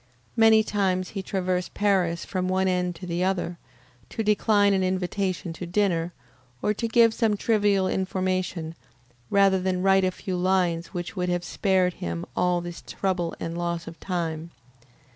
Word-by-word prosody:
Many 225 -1 +6
times 190 -3 0
he 200 - -5
has 190 - -6
traversed 185 -2 -1
Paris 185 -5 +1
from 185 -1 -2
one 190 0 +1
end 180 -1 0
to 180 - -9
the 175 0 -1
other, 180 -2 -1 0.5
to 225 - -3
decline 205 -1 +3
an 190 - +2
invitation 185 -1 -1
to 175 +2 -7
dinner, 175 -3 +1 0.5
or 210 - +2
to 230 +2 -2
give 230 0 +5
some 220 -3 +1
trivial 205 -3 +2
information, 185 -3 -2 0.6
rather 195 -1 +4
than 185 0 -1
write 195 0 +4
a 185 - +3
few 185 0 -4
lines 180 -2 +1
which 175 -2 -6
would 180 -1 -1
have 175 0 0
spared 185 -1 +1
him 85 - -4
all 180 -1 +2
this 175 0 -7
trouble 180 -3 -2
and 165 0 -4
loss 170 -1 -2
of 165 0 -10
time. 170 -3 -3
185 Hz, 165 wpm, -25 LUFS, 175-195 Hz, 0.6 s, Many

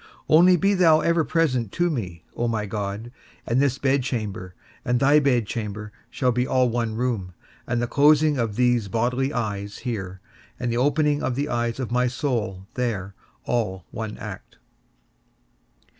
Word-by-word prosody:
Only 175 +4 +6
be 195 +4 +2
thou 165 -4 +5
ever 170 -1 +2
present 130 - 0
to 175 0 +1
me, 90 - -5
O 120 - -1
my 110 -2 -1
God, 105 +2 -4 0.3
and 120 +3 +2
this 135 -2 +1
bedchamber 115 -10 -1 0.3
and 125 0 +1
thy 145 +2 +5
bedchamber 110 -6 -1 0.2
shall 125 +1 +1
be 125 +1 0
all 130 -1 +2
one 115 -2 -1
room, 110 -7 -2 0.3
and 120 0 0
the 120 - 0
closing 145 +2 +4
of 115 -3 -1
these 120 -3 +2
bodily 125 +6 0
eyes 105 -5 -3
here, 95 -6 -4 0.4
and 120 -1 -1
the - - -1
opening 145 +2 +2
of 125 - -1
the 145 +3 -2
eyes 120 0 -1
of 125 -3 -3
my 125 +1 +2
soul 115 -7 -2
there, 105 -6 -2 0.3
all 100 -7 -1
one 110 -1 -5
act. - - -9
120 Hz, 160 wpm, -24 LUFS, 105-140 Hz, 0.4 s, Only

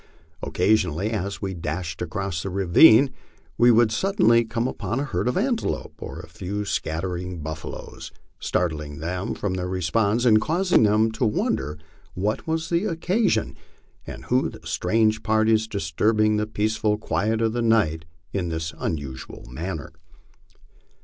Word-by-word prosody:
Occasionally, 95 0 +1
as 100 -2 -3
we 95 -1 -2
dashed 85 0 -4
across 90 0 -3
a 100 - -3
ravine, 110 - +6 0.4
we 120 +2 +5
would 115 -1 +5
suddenly 180 - +3
come 115 +2 -2
upon 120 -1 -3
a - - 0
herd 145 - -2
of 125 - 0
antelopes 235 +3 -1
or - - -7
a - - -9
few 105 +3 -5
scattering 90 -1 -3
buffaloes, 80 0 -7 0.3
startling 75 -4 -2
them 90 +6 -3
from 100 -3 -2
their 90 -1 -2
repose 100 +6 +1
and 110 -3 +6
causing 175 - +2
them 110 +1 +3
to 110 +3 -3
wonder 75 -8 0 0.4
what 105 - -2
was 160 0 -1
the 175 +5 +1
oc 165 - -3
casion 180 - +1 0.5
and - - -8
who - - +1
the - - -13
strange 110 +3 +1
parties 110 0 +2
disturbing 105 +4 +1
the 105 0 -1
peaceful 110 0 0
quiet 110 +1 -1
of 110 -1 +1
the 120 - -1
night 100 -9 +2 0.3
in 90 -4 -1
this 80 -1 -3
unusual 70 -5 -5
manner. 80 +3 -5
105 Hz, 150 wpm, -24 LUFS, 90-115 Hz, 0.5 s, ravine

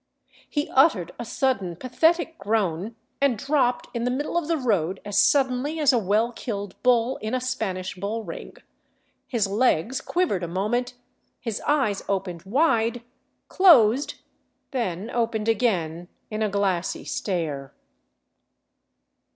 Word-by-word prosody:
He 295 -1 -1
uttered 260 - +3
a - - -3
sudden 225 -7 -1
pathetic 325 - +1
groan, 200 0 -1 0.3
and 275 -5 +3
dropped 260 0 +1
in 235 -1 -2
the 245 - +1
middle 275 +6 -2
of 345 -3 0
the 330 -1 +1
road 195 - 0
as 205 -1 +1
suddenly 275 +3 +2
as 290 -3 +4
a 245 - +3
well 215 +4 +1
killed 205 -5 -5
bull 250 0 +3
in 220 +3 -3
a - - +1
Spanish 220 -8 -3
bull 205 +5 -4
ring; 170 -5 -8 0.7
his 230 -5 +1
legs 220 +2 +1
quivered 345 - 0
a 175 - -3
moment, 225 +8 -1 0.4
his 225 -3 -4
eyes 260 -9 +2
opened 185 -4 -2
wide, 235 -1 +1 0.4
closed, 280 - +5 0.6
then 220 - -3
opened 230 -2 -1
again 175 -8 0 0.2
in 215 +1 -3
a 215 - +1
glassy 195 -3 -1
stare. 155 -8 -3
225 Hz, 135 wpm, -25 LUFS, 195-255 Hz, 0.7 s, closed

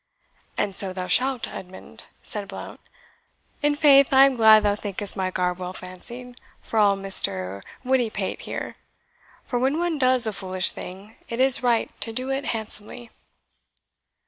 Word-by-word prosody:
"And 195 - -1
so 195 -2 +3
thou 185 -1 -4
shalt, 255 +4 +1
Edmund," 185 0 -11 0.2
said 205 -2 -5
Blount. - - -9 0.8
"In 295 0 +2
faith 280 -2 +6
I 270 0 +8
am 275 -1 +1
glad 220 -2 +7
thou 205 -1 +2
thinkest 205 -1 -3
my 190 -2 -1
garb 180 -1 -1
well 180 0 -5
fancied, 240 +8 -9 0.2
for 225 - -2
all 205 -1 +5
Mr. 100 - -1 0.2
Wittypate 235 -6 -1
here; - - -6 0.7
for 245 - -2
when 265 +4 +1
one 340 -3 -1
does 255 -2 +3
a 220 - -1
foolish 185 -1 0
thing, 195 +4 -9
it 230 - -4
is 265 0 +5
right 240 -2 +1
to 225 - -2
do 255 +4 -3
it 270 +1 -2
handsomely." 225 +1 -5
220 Hz, 155 wpm, -24 LUFS, 190-255 Hz, 0.8 s, I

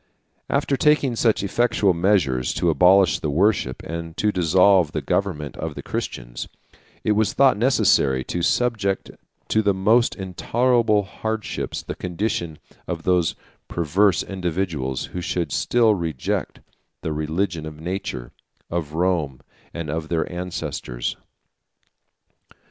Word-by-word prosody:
After 140 - +1
taking 145 -3 +3
such 110 -3 +2
effectual 105 -2 +2
measures 85 -9 +1
to 85 - +2
abolish 90 +3 +5
the 75 - -2
worship, 85 -4 +1
and 85 0 -6
to 105 - +2
dissolve 90 -1 +4
the - - -1
government 75 -8 -1
of - - -4
the - - -7
Christians, - - -5 0.6
it - - +1
was 105 0 +2
thought 135 -1 +5
necessary 70 - +3
to 85 - -3
subject 100 0 0 0.4
to 110 - +3
the 100 -2 +2
most 110 +6 +3
intolerable 110 +3 +1
hardships 110 +2 -4
the - - -5
condition 90 -3 -3 0.3
of 85 -2 -4
those 90 -3 +2 0.3
perverse 85 +1 +2
individuals 85 -8 -2
who 90 - -3
should 85 -2 -2
still 115 - +3
reject 80 -8 -3 0.4
the 80 - -2
religion 80 +2 -2
of 75 -1 -9
nature, 85 -8 -4 0.4
of 80 -3 -3
Rome, 80 -7 0 0.3
and 85 -3 -5
of 80 0 -4
their 85 -2 0
ancestors. 80 -9 -4
90 Hz, 125 wpm, -23 LUFS, 80-105 Hz, 0.6 s, abolish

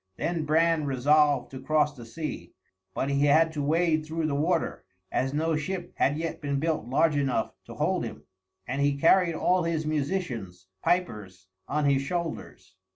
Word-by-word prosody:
Then 165 -2 -2
Bran 160 0 +2
resolved 140 0 +3
to 130 -1 -8
cross 150 +1 +1
the 120 -3 -11
sea, 155 +6 -6 0.4
but 135 - -1
he 140 +1 +2
had 160 +3 +4
to 150 - -2
wade 160 +2 +2
through 160 +1 -3
the 155 - -1
water, 160 +4 0 0.3
as 135 +1 0
no 160 +2 0
ship 175 +3 -4
had 145 +2 +2
yet 165 0 -4
been 140 -1 -1
built 155 -5 -1
large 150 +4 +2
enough 135 -5 0
to - - -10
hold - - 0
him; - - -7 0.4
and 135 +3 -2
he 140 0 +2
carried 170 +2 +4
all 180 +3 +2
his 165 -2 -1
musicians 140 - -3 0.2
(pipers) 105 - -2 0.2
on 150 +1 0
his 140 -1 +3
shoulders. 140 - -5
150 Hz, 170 wpm, -27 LUFS, 135-165 Hz, 0.4 s, had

